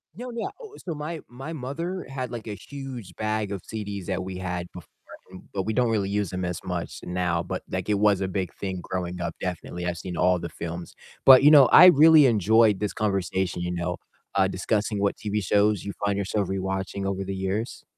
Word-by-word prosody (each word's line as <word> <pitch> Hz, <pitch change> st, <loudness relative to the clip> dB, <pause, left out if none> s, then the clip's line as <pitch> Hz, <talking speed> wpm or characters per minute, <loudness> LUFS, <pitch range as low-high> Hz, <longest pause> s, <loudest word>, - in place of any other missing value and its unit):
No, 245 Hz, +3 st, -7 dB
yeah, 235 Hz, +11 st, -3 dB
oh, 435 Hz, -2 st, -11 dB
so 170 Hz, -, -5 dB
my 155 Hz, +2 st, -5 dB
my 135 Hz, +7 st, -8 dB
mother 165 Hz, +7 st, -4 dB
had, 130 Hz, -2 st, -5 dB
like, 115 Hz, -2 st, -7 dB
a 105 Hz, -, -4 dB
huge 125 Hz, -, -9 dB
bag 110 Hz, -1 st, -2 dB
of 100 Hz, -3 st, -5 dB
CDs 100 Hz, -4 st, -5 dB
that 95 Hz, -1 st, -2 dB
we 95 Hz, 0 st, -6 dB
had 90 Hz, -1 st, -4 dB
before, 90 Hz, -, -11 dB, 0.4 s
and, 95 Hz, -, -11 dB
but, 95 Hz, -, -1 dB
we 110 Hz, -, -2 dB
don't 125 Hz, 0 st, +2 dB
really 100 Hz, -3 st, 0 dB
use 100 Hz, -2 st, -1 dB
them 90 Hz, 0 st, -3 dB
as 90 Hz, -1 st, -3 dB
much 90 Hz, -2 st, -4 dB
now, 90 Hz, -1 st, -1 dB
but, 90 Hz, +2 st, -5 dB
like, 95 Hz, +1 st, -3 dB
it 105 Hz, -, +3 dB
was 100 Hz, -1 st, +3 dB
a 95 Hz, -, 0 dB
big 95 Hz, -2 st, -3 dB
thing 95 Hz, -2 st, -5 dB
growing 90 Hz, -1 st, -4 dB
up, -, -, -3 dB
definitely. 90 Hz, -1 st, -4 dB
I've 85 Hz, -, -2 dB
seen 90 Hz, +1 st, -6 dB
all 90 Hz, 0 st, +3 dB
the 85 Hz, -1 st, -5 dB
films, 85 Hz, +2 st, -7 dB, 0.3 s
but, 130 Hz, -1 st, +10 dB
you 150 Hz, -, +8 dB
know, 145 Hz, -4 st, +9 dB
I 180 Hz, -, +9 dB
really 155 Hz, -3 st, +8 dB
enjoyed 110 Hz, -1 st, +4 dB
this 105 Hz, 0 st, -2 dB
conversation, 95 Hz, -3 st, -1 dB
you 90 Hz, -, -2 dB
know, 85 Hz, -1 st, -3 dB, 0.4 s
uh, 95 Hz, -1 st, +4 dB
discussing 105 Hz, +2 st, -1 dB
what 100 Hz, -, 0 dB
TV 105 Hz, 0 st, -2 dB
shows 105 Hz, +1 st, +2 dB
you 100 Hz, -, -5 dB
find 100 Hz, -1 st, +1 dB
yourself 100 Hz, 0 st, -1 dB
rewatching 95 Hz, 0 st, -3 dB
over 95 Hz, 0 st, -2 dB
the 95 Hz, 0 st, -4 dB
years. 95 Hz, +5 st, -3 dB
100 Hz, 215 wpm, -25 LUFS, 90-115 Hz, 0.4 s, but